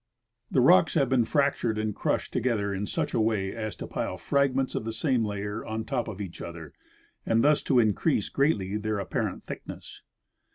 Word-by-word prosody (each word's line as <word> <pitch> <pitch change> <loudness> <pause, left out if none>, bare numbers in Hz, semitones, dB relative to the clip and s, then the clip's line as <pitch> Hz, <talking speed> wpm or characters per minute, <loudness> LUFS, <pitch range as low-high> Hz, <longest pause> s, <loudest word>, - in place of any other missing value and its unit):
The - - +3
rocks 90 - +5
have 140 -5 +3
been 125 -3 +3
fractured 140 -6 +1
and 110 -1 -1
crushed - - -1
together 105 -5 0
in 100 +1 -3
such - - -2
a - - +1
Avay 110 -3 +1
as 110 -4 -4
to - - -7
pile - - -3
fragments 135 -1 +1
of - - -2
the 115 0 -4
same 125 0 +1
layer 105 +1 -3
on 110 0 -4
top 120 0 -2
of 105 -3 -6
each 95 -4 -6
other, 85 -3 -8 0.5
and 115 0 +2
thus 150 0 +4
to 130 - +1
increase 110 - +2
greatly 105 -9 +1
their 105 0 -2
apparent 100 -3 -2
thickness. - - -9
110 Hz, 190 wpm, -27 LUFS, 100-130 Hz, 0.5 s, rocks